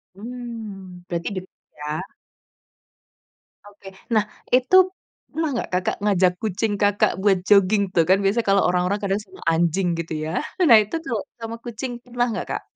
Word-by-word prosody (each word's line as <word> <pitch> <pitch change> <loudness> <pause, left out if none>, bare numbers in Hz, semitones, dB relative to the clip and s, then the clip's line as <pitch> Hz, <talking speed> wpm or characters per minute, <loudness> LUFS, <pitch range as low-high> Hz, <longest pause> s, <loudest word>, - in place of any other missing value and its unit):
Mmm, 215 -6 -8
berarti 170 -1 -3
deket 185 0 -8 0.2
ya? 150 0 -4 1.7
Oke, 205 -1 -15 0.3
nah 215 -1 +3 0.3
itu 255 +8 +4 0.6
pernah 320 0 -1
nggak 235 - -3
Kakak 180 0 0
ngajak 190 -3 +3
kucing 215 0 -1
Kakak 205 0 +3
buat 195 -1 +4
jogging 200 0 +5
tuh, 165 - +4
kan 190 - +6
biasanya 210 +4 +1
kalau 195 0 +4
orang-orang 180 +3 +1
kadang 200 +1 0
sama 190 -1 -16
anjing 170 +3 +1
gitu 165 -1 -4
ya, 160 - -3 0.4
nah 230 - +10
itu 210 - -6
tuh 235 -7 -2 0.2
sama 225 0 -5
kucing 240 +2 -5
pernah 245 0 -1
nggak, - - -3
Kak? - - -2
200 Hz, 155 wpm, -23 LUFS, 185-225 Hz, 1.7 s, nah